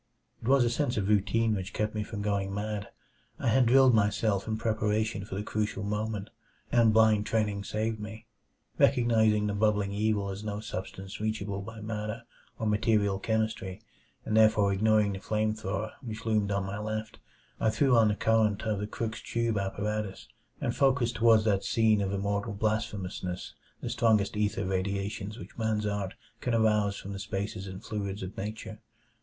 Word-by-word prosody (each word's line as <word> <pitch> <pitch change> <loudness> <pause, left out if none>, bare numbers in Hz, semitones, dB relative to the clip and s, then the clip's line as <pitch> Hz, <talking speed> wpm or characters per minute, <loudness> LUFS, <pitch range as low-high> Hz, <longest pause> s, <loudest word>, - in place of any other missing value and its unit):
It - - -6
was 135 -1 +5
a 120 - +2
sense 125 -1 0
of 100 -1 0
routine 110 +2 +2
which 95 -1 -4
kept 105 0 -1
me 105 - -2
from 105 -1 -5
going 100 -1 0
mad. 105 0 -3 0.5
I - - 0
had 125 +2 +4
drilled 130 +1 +6
myself 105 -1 +2
in 110 -1 -1
preparation 110 -1 0
for 95 - -6
the 100 - -2
crucial 105 -1 -2
moment, 105 0 -3 0.4
and 115 -2 +5
blind 110 -1 +4
training 105 -3 0
saved 110 +1 -2
me. 110 +1 -8 0.5
Recognizing 110 -3 +4
the 105 - 0
bubbling 105 -1 +1
evil 105 -1 0
as 100 +2 -5
no 105 -1 -3
substance 95 0 -6
reachable 105 -2 -2
by 110 +2 -9
matter 110 +1 -4 0.3
or 110 - -3
material 105 -2 +2
chemistry, 110 -4 -1 0.5
and 110 - -1
therefore 110 -2 +5
ignoring 105 0 +3
the 95 - -5
flame 110 +2 0
thrower 110 0 -3
which 115 -3 -7
loomed 105 -2 +1
on 100 -1 0
my 100 +1 -4
left, 110 +1 -4 0.4
I 110 - +3
threw 130 +3 +3
on 115 -2 +6
the 105 - +1
current 110 -1 +2
of 110 -3 -1
the 105 - -3
Crookes 110 +1 -4
tube 115 -3 -1
apparatus, 100 - -3 0.3
and - - -1
focussed 130 -3 +2
toward 115 -1 +5
that 100 -3 +1
scene 110 -2 +3
of 95 -1 -1
immortal 100 +2 -1
blasphemousness 100 -4 -2 0.3
the - - -3
strongest 105 -4 +2
ether 105 -2 0
radiations 100 +2 -2
which 95 +1 -11
man's 110 -1 0
art 100 -2 -2 0.2
can 125 -1 0
arouse 105 -2 +2
from 100 - -7
the 100 - -6
spaces 100 -1 -4
and 95 +2 -8
fluids 100 -3 -4
of 95 +1 -6
nature. 110 +1 -6
105 Hz, 175 wpm, -29 LUFS, 100-110 Hz, 0.5 s, drilled